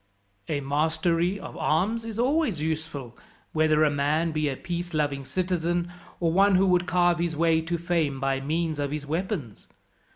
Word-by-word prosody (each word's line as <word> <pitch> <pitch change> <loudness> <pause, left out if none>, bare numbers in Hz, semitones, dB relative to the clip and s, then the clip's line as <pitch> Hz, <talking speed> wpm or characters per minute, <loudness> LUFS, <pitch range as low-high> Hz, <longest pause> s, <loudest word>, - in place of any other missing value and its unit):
"A 145 -2 -1
mastery 165 +6 +1
of - - -9
arms 195 +11 0
is 225 -2 -6
always 255 - +1
useful, 155 -6 -4 0.4
whether 155 -1 +3
a 150 - +4
man 150 +4 +1
be 155 -1 0
a 135 - -2
peace 175 -1 -4
loving 145 -2 0
citizen, 175 +1 -1 0.3
or 165 -2 +1
one 195 +1 +5
who 190 +1 +4
would 180 -1 +2
carve 175 +1 +3
his 170 -2 -1
way 165 0 +3
to 170 +2 -2
fame 165 -5 0
by 135 0 0
means 155 +2 -1
of 145 -1 -1
his 150 0 -4
weapons. 160 - -4
160 Hz, 170 wpm, -26 LUFS, 150-175 Hz, 0.4 s, one